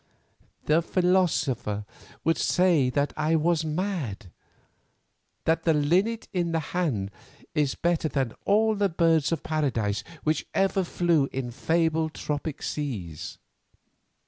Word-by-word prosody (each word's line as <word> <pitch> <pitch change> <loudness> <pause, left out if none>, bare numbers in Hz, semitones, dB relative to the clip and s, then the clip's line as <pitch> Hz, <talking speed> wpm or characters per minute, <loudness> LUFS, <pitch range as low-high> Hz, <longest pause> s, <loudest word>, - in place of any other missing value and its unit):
"The 155 +2 +3
philosopher 160 - +1 0.4
would 165 0 +2
say 175 -8 +3
that 140 +3 0
I 155 +1 +1
was 160 +1 +2
mad; 155 - -3 1.1
that 165 0 +2
the 160 -2 +2
linnet 185 +10 +1
in 175 -3 0
the 165 - +2
hand 130 - 0 0.4
is 150 -4 +1
better 170 -2 +1
than 135 -5 -1
all 220 +2 +3
the 200 -1 +1
birds 165 -3 +2
of 165 - -1
paradise 120 -10 -1 0.2
which 155 0 0
ever 195 0 +2
flew 170 -5 +1
in 130 -2 -3
fabled 160 +4 0
tropic 150 0 -4
seas. 100 - -4
160 Hz, 120 wpm, -26 LUFS, 140-175 Hz, 1.1 s, The